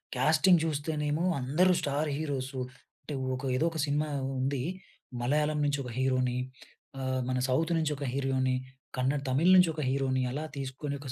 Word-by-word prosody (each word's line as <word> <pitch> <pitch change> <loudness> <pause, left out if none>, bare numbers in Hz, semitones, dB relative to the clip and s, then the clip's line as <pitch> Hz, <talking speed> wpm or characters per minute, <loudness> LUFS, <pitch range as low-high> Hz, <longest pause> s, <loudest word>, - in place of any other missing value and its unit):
Casting 160 +6 +4
చూస్తేనేమో 150 +1 -1 0.2
అందరూ 160 +9 +3
star 145 +2 0
heroes. 140 -3 -3 0.5
అంటే 150 - -7 0.2
ఒక 125 - -6
ఏదో 145 +6 +2
ఒక 160 - -5
సినిమా 150 +1 0 0.3
ఉంది. 135 -1 0 0.6
మలయాళం 150 +4 +1
నుంచి 145 -1 0
ఒక 125 - -6
హీరో‌ని 130 -1 +1 0.6
ఆహ్, 130 -1 -1
మన 130 - 0
సౌత్ 160 +6 +1
నుంచి 155 -2 0
ఒక 140 - -4
హీరో‌ని, 130 -1 +1 0.4
కన్నడ 130 +3 +1
తమిళ్ 160 +8 +4
నుంచి 180 -2 +6
ఒక 155 - -3
హీరో‌ని 130 -1 +1
అలా 150 +4 -3
తీసుకొని 135 +2 -4
140 Hz, 150 wpm, -30 LUFS, 130-155 Hz, 0.6 s, నుంచి